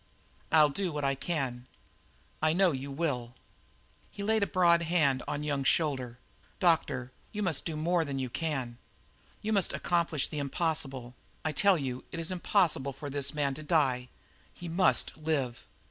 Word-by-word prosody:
"I'll 155 -2 +6
do 185 +3 -2
what 150 -1 -3
I 135 0 +2
can." 130 -5 -3 0.7
"I 155 0 +3
know 185 0 +4
you 135 0 -4
will." 135 -5 -2 0.7
He 200 - -7
laid 220 +1 +2
the 200 - +2
broad 170 -2 +4
hand 155 -6 +2
on 145 0 -2
Young's 140 -3 -1
shoulder. 130 -7 +1 0.4
"Doctor, 160 -8 +1 0.2
you 210 0 -3
must 170 -7 -1
do 160 - -3
more 170 +2 +2
than 140 -3 -4
you 130 -1 -1
can; 130 -4 -3 0.6
you 220 +1 0
must 195 -4 +3
accomplish 170 -4 +1
the 150 - -4
impossible; 135 -4 -2 0.3
I 155 - +1
tell 190 +5 +4
you, 130 -4 -4
it - - -5
is 165 +2 -2
impossible 175 -7 +1
for 145 +2 -7
this 140 +1 -1
man 140 -2 +1
to 145 - -8
die; 135 -6 +1 0.4
he 175 - -9
must 180 +3 +3
live!" 145 -6 -2
150 Hz, 165 wpm, -30 LUFS, 135-170 Hz, 0.7 s, I'll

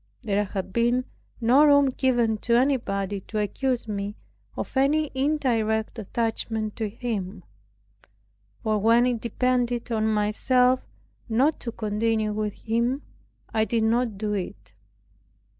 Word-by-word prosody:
There 205 -2 +1
had 190 -1 -5
been 240 +2 +2 0.3
no 250 +5 +5
room 285 -2 +6
given 240 -4 +1
to 235 +1 +2
anybody 205 -7 0
to 215 - -6
accuse 240 +4 -1
me 205 0 -3 0.4
of - - -5
any 290 +3 +2
indirect 240 -6 0
attachment 220 0 -2
to 220 -3 -2
him; 200 -4 -4 1.2
for 215 -1 +1
when 230 +3 +4
it 245 -3 0
depended 245 0 0
on 220 -1 +1
myself 250 +4 +2 0.5
not 265 +8 +2
to 235 - -5
continue 215 0 -1
with 210 -1 -2
him, 235 +5 0 0.5
I 220 - +3
did 225 0 0
not 230 -1 +1
do 210 0 -2
it. 175 - -5
230 Hz, 125 wpm, -25 LUFS, 210-250 Hz, 1.2 s, room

